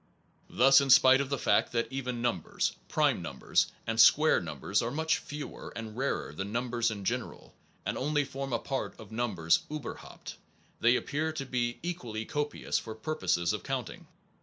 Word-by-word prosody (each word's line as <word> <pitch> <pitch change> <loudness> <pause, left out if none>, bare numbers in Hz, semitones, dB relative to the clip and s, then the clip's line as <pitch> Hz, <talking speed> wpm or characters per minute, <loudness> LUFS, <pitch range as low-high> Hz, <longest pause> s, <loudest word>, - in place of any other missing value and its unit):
Thus, 135 +1 +6
in 140 - -1
spite 130 +1 +7
of 135 - -3
the 140 - -1
fact - - +2
that 115 0 +1
even 125 -3 -3
num 120 -7 +1
bers, - - -2
prime - - +2
numbers, - - 0 0.2
and 115 0 +3
square 155 +6 +6
numbers 85 - -1
are 115 - -1
much 160 +4 0
fewer 150 0 -8
and 110 -2 -6
rarer 135 - -2
than 95 +6 -5
numbers 120 0 0
in 100 -3 -6
general, - - -4 0.3
and - - -2
only 145 +1 +1
form 135 0 -5
a 120 - +2
part 135 +3 -4
of 110 -2 -12
numbers 90 -9 +1
iiberhaupt 150 -4 -8 0.4
they 120 +2 +4
appear 155 +4 -1
to 140 -3 -4
be 120 -2 -1
equally 120 -11 -4
copious 150 -1 -2
for 110 -1 -8
purposes 110 - 0
of - - -3
counting. - - -5
125 Hz, 175 wpm, -30 LUFS, 110-140 Hz, 0.4 s, spite